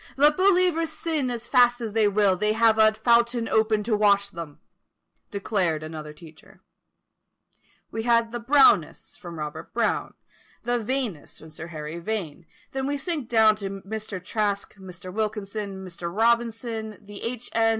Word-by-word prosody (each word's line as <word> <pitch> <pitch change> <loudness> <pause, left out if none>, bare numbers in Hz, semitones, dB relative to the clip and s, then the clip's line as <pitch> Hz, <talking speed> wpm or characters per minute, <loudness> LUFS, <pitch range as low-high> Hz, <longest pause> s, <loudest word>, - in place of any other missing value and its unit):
"Let 295 +2 +5
believers 360 -3 +3
sin 310 -4 -1
as 240 -2 -4
fast 245 -1 +4
as 225 -3 -5
they 220 -2 +3
will, 200 -2 +3
they 210 +3 +1
have 225 0 +3
a 215 0 +7
fountain 235 +1 +2
open 220 -1 +2
to 220 0 +1
wash 200 -1 +3
them;" 165 -4 -8 0.7
declared 190 -6 -1
another 155 -1 -7
teacher. 155 0 -16 1.3
We 225 - -3
had 230 0 +2
the 240 - -4
Brownists, 260 - +3
from 170 -4 -9
Robert 155 +1 -6
Brown, 235 -1 0 0.5
the 240 +1 0
Vaneists, 230 - -3
from 160 0 -13
Sir 160 +1 -7
Harry 155 0 -6
Vane, 175 -5 -4 0.2
then 265 0 -2
we 285 0 -1
sink 290 -4 -3
down 220 -2 +5
to 200 -2 -4
Mr. 195 0 -6
Traske, 200 +1 -2
Mr. 185 -1 -9
Wilkinson, 205 -2 -4
Mr. 170 -1 -6
Robinson, 225 +1 0
and 205 - -20
H. 230 +4 -6
N. 225 0 +3
215 Hz, 155 wpm, -25 LUFS, 190-235 Hz, 1.3 s, a